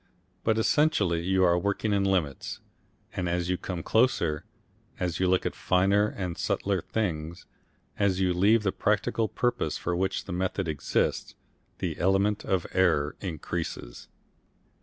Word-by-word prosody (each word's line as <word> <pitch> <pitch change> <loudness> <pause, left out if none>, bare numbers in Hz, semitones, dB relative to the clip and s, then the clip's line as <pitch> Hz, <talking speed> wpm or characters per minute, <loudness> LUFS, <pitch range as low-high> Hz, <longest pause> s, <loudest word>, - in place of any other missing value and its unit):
But 110 -1 +2
essentially 110 - +2
you 95 +2 +2
are 90 -1 +4
working 100 +3 0
in 100 -1 +2
limits, 90 -9 -1 0.6
and 90 -1 -1
as 90 +1 0
you 90 - 0
come 90 -3 -5
closer, 85 - +2 0.5
as 90 -3 -2
you 95 - +2
look 90 0 +2
at - - -1
finer 100 +3 +2
and 90 -5 -5
subtler 95 -3 0
things, 85 -6 -3 0.5
as 95 -2 +2
you 90 -1 +2
leave 105 +5 +4
the 95 - +1
practical 110 +2 0
purpose 120 +2 -1
for 90 - -2
which 95 +2 -1
the 95 - -5
method 95 +1 -1
exists, 75 -3 -1 0.4
the - - -3
element 95 +3 +2
of 95 -3 0
error 80 -6 +2
increases. 80 -7 -5
95 Hz, 145 wpm, -28 LUFS, 85-100 Hz, 0.6 s, are